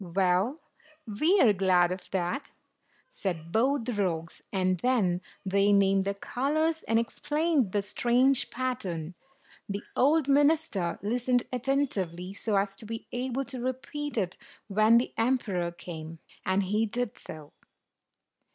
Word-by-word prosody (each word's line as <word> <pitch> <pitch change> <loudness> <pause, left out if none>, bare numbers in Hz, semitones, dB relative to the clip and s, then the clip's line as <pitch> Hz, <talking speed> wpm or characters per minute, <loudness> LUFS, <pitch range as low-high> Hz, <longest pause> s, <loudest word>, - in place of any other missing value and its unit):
"Well, 190 - +1 0.5
we 305 - +2
are 220 -4 +6
glad 180 -2 +3
of 185 0 -6
that," 190 +9 -2 0.6
said 170 - -4
both 255 +3 +2
the 245 - -2
rogues; 170 -5 -2
and 185 -2 +1
then 195 -8 +1 0.2
they 200 +1 +3
named 195 -1 +4
the 200 0 -1
colors, 310 +9 0
and 225 - +3
explained 295 - 0
the 205 0 0
strange 245 +5 +2
pattern. 185 -10 -3 0.6
The 200 +1 -3
old 290 +2 +3
minister 285 - +2
listened 245 +3 +1
attentively, 215 -9 -1
so 210 +1 -2
as 195 0 +1
to - - -10
be 225 0 -5
able 260 +2 -2
to 255 -2 -6
repeat 260 +3 -4
it 185 -4 -1 0.3
when 215 +3 +5
the 240 - 0
emperor 225 -8 0
came. 165 -2 -8 0.3
And 190 +1 +2
he 210 +4 +1
did 245 +1 -3
so. 155 -2 -10
215 Hz, 135 wpm, -28 LUFS, 185-255 Hz, 0.6 s, are